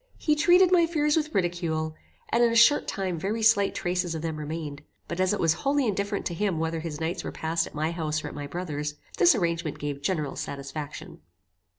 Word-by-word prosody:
He 305 Hz, -, +2 dB
treated 355 Hz, +4 st, +5 dB
my 340 Hz, -2 st, +5 dB
fears 300 Hz, -3 st, +1 dB
with 310 Hz, -1 st, -1 dB
ridicule, 170 Hz, -4 st, -1 dB, 0.4 s
and 235 Hz, +1 st, +3 dB
in 235 Hz, -, +4 dB
a -, -, -1 dB
short 235 Hz, +5 st, +6 dB
time 185 Hz, -4 st, -2 dB
very 215 Hz, +6 st, -2 dB
slight 200 Hz, -3 st, +4 dB
traces 175 Hz, -1 st, -1 dB
of 160 Hz, -, -5 dB
them 160 Hz, -2 st, -3 dB
remained: 150 Hz, -1 st, -5 dB, 0.3 s
but 170 Hz, -, -5 dB
as 185 Hz, 0 st, +3 dB
it 210 Hz, -, -1 dB
was 165 Hz, -1 st, +3 dB
wholly 275 Hz, 0 st, +2 dB
indifferent 200 Hz, -1 st, -1 dB
to 175 Hz, -, -2 dB
him 190 Hz, -1 st, -1 dB
whether 160 Hz, +1 st, -1 dB
his 155 Hz, -2 st, -5 dB
nights 165 Hz, +2 st, -2 dB
were -, -, -4 dB
passed 165 Hz, +1 st, -1 dB
at -, -, -13 dB
my 155 Hz, +2 st, 0 dB
house 155 Hz, -2 st, -2 dB
or -, -, -4 dB
at -, -, -7 dB
my 145 Hz, -1 st, -6 dB
brother's, 150 Hz, -2 st, -4 dB, 0.2 s
this 175 Hz, -, +6 dB
arrangement 170 Hz, -5 st, -1 dB
gave 145 Hz, -1 st, -4 dB
general 150 Hz, -3 st, -1 dB
satisfaction. 140 Hz, +2 st, -6 dB
170 Hz, 215 wpm, -27 LUFS, 155-210 Hz, 0.4 s, short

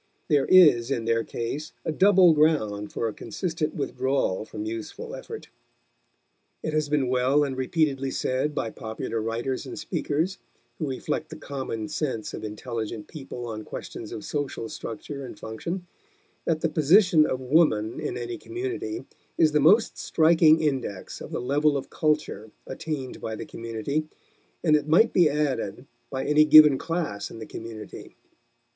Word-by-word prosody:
There 145 Hz, -3 st, +3 dB
is 150 Hz, -11 st, +6 dB
in 120 Hz, -5 st, -1 dB
their 115 Hz, 0 st, +1 dB
case 135 Hz, +9 st, -5 dB
a -, -, 0 dB
double 185 Hz, 0 st, +6 dB
ground 110 Hz, -10 st, +1 dB
for 115 Hz, -, -2 dB
a 110 Hz, -, -4 dB
consistent 160 Hz, -, -3 dB
withdrawal 130 Hz, -7 st, -1 dB
from 105 Hz, -, -6 dB
useful 110 Hz, 0 st, -6 dB
effort. -, -, -8 dB, 1.1 s
It 155 Hz, -, -2 dB
has 155 Hz, -1 st, 0 dB
been 145 Hz, -3 st, +1 dB
well 130 Hz, +3 st, +3 dB
and 135 Hz, -2 st, -2 dB
repeatedly 135 Hz, 0 st, 0 dB
said 130 Hz, +3 st, -1 dB
by 115 Hz, -6 st, -2 dB
popular 110 Hz, +1 st, -4 dB
writers 115 Hz, +4 st, -3 dB
and -, -, -7 dB
speakers 165 Hz, +2 st, -2 dB, 0.4 s
who 155 Hz, -4 st, -2 dB
reflect 130 Hz, -, -3 dB
the -, -, -8 dB
common 130 Hz, -6 st, -5 dB
sense 140 Hz, -8 st, -3 dB
of -, -, -6 dB
intelligent 110 Hz, 0 st, -5 dB
people 135 Hz, -6 st, -8 dB
on 110 Hz, -2 st, -5 dB
questions 110 Hz, 0 st, -8 dB
of 155 Hz, -, -6 dB
social 145 Hz, -7 st, -3 dB
structure 140 Hz, +5 st, -6 dB
and 125 Hz, -, -9 dB
function 170 Hz, -, -5 dB, 0.6 s
that 160 Hz, -2 st, 0 dB
the 165 Hz, -, +1 dB
position 160 Hz, +1 st, +5 dB
of 130 Hz, -, -2 dB
woman 130 Hz, -6 st, +2 dB
in -, -, -3 dB
any 120 Hz, -1 st, -5 dB
community 365 Hz, -1 st, -4 dB, 0.3 s
is 155 Hz, -1 st, +4 dB
the 150 Hz, -, +3 dB
most 200 Hz, +10 st, +4 dB
striking 160 Hz, -1 st, +4 dB
index 130 Hz, -10 st, -3 dB
of -, -, -7 dB
the -, -, -2 dB
level 145 Hz, +4 st, +2 dB
of 135 Hz, -, -7 dB
culture 150 Hz, -8 st, -1 dB, 0.2 s
attained 135 Hz, -1 st, -5 dB
by 110 Hz, -, -4 dB
the -, -, -6 dB
community, 115 Hz, +7 st, -3 dB, 0.6 s
and 155 Hz, -3 st, +5 dB
it 150 Hz, -1 st, 0 dB
might 175 Hz, +9 st, +5 dB
be 170 Hz, -4 st, +5 dB
added, 140 Hz, -6 st, -2 dB, 0.2 s
by 130 Hz, -1 st, -3 dB
any 150 Hz, +1 st, +5 dB
given 150 Hz, -2 st, +8 dB
class 165 Hz, -, -3 dB
in -, -, -10 dB
the 110 Hz, -, -7 dB
community. 110 Hz, -2 st, -9 dB
140 Hz, 160 wpm, -26 LUFS, 115-155 Hz, 1.1 s, given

